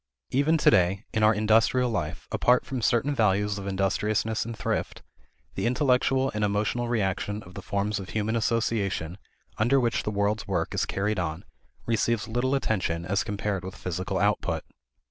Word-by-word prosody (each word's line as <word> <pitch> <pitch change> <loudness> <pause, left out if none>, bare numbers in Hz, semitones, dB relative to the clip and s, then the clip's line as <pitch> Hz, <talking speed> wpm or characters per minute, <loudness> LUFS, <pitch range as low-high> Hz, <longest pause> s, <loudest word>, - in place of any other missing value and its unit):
Even 145 +5 +3
today, 95 - +3
in 110 - +1
our 110 0 +6
industrial 115 +4 +3
life, 85 -8 -3
apart 125 +1 +3
from 130 -2 -4
certain 120 +6 +2
values 105 -3 +1
of 100 - -6
industriousness 105 +3 0
and 115 -1 -6
thrift, - - -3 0.5
the - - -1
intellectual 130 +1 +2
and 105 0 -1
emotional 105 +4 0
reaction 105 -1 -1
of 90 - -14
the - - -7
forms 100 +1 -1
of 95 -1 -8
human 110 +2 -1
association 105 -6 -1 0.4
under 120 +6 +4
which 120 -2 +1
the - - -3
world's 105 +1 -1
work 90 -4 -1
is - - 0
carried 105 +1 -1
on 80 0 -3 0.4
receives 115 -1 0
little 120 +4 0
attention 90 -10 -1
as 100 +2 0
compared 100 -2 -3
with 95 0 -7
physical 90 +1 -3
output. - - 0
105 Hz, 165 wpm, -27 LUFS, 100-115 Hz, 0.5 s, our